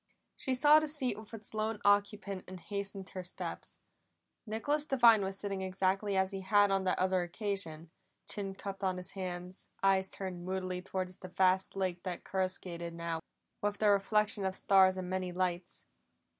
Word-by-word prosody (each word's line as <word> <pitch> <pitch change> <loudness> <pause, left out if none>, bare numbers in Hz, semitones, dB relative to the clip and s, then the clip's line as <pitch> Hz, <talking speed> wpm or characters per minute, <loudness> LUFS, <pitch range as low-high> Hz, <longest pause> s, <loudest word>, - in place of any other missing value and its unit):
She 260 - -1
saw 295 +4 +7
the 310 - -2
seat 270 -7 0
with 215 -1 -12
its 220 -2 -8
lone 215 0 -1
occupant, 205 -1 +2
and 185 0 -8
hastened 195 +1 -4
her 185 - -5
steps. 180 0 -5 0.7
Nicholas 285 +8 0
Devine 240 -7 +6
was 190 0 -2
sitting 195 -1 -3
exactly 190 +1 0
as 190 0 +2
he 195 -1 -4
had 205 +1 +4
on 195 -1 +1
that 185 - +2
other 185 0 +2
occasion, 175 -3 -2 0.4
chin 195 -2 -4
cupped 195 0 -6
on 185 -1 +1
his 180 +1 -6
hands, 180 -1 -6
eyes 190 -1 +3
turned 185 -3 -5
moodily 185 0 -3
toward 185 0 -3
the 185 0 -9
vast 185 +1 +2
lake 185 -2 -1
that 180 -2 -5
coruscated 180 -3 -2
now 170 -1 -3 0.4
with 205 0 0
the 210 -1 +4
reflection 205 +1 +2
of 190 0 -1
stars 190 -1 +5
and 185 -1 -4
many 185 0 -2
lights. 180 0 -2
190 Hz, 170 wpm, -33 LUFS, 185-205 Hz, 0.7 s, saw